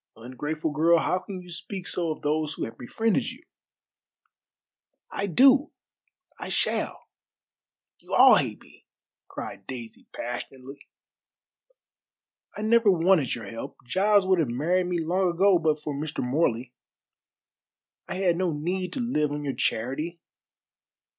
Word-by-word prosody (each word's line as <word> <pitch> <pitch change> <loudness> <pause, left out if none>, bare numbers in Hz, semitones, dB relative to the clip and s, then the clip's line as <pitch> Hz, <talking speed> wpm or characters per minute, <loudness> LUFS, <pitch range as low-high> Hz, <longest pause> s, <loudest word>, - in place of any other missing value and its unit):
Ungrateful 150 +7 -4
girl, 165 +3 +4
how 180 +3 +1
can 185 0 -8
you 180 - -14
speak 180 +2 -6
so 170 -2 -1
of 155 - -5
those 150 0 0
who - - -3
have 115 - -9
befriended 220 - 0
you?" - - -12 1.7
"I 200 - -2
do. 265 - +5 0.7
I - - -6
shall. - - -1 1.0
You - - -4
all - - +8
hate - - -2
me!" - - -21 0.4
cried - - -8
Daisy 120 -3 -9
passionately. 130 +3 -7 1.7
"I 210 - -4
never 225 0 +4
wanted 170 -5 +3
your 115 -3 -8
help. 115 +3 -7
Giles 200 +7 +3
would 185 -1 +3
have 150 -7 +1
married 170 +9 +1
me 175 -1 -1
long 180 +3 +1
ago 190 0 +4
but 155 -2 +1
for 150 -1 -4
Mr. 150 0 -4
Morley. 125 -2 0 1.3
I - - -4
had 185 -3 +1
no 185 -1 0
need 180 +4 -3
to - - -3
live 150 - 0
on 145 0 -4
your 140 -2 -2
charity. 150 +9 -2
165 Hz, 140 wpm, -26 LUFS, 140-185 Hz, 1.7 s, all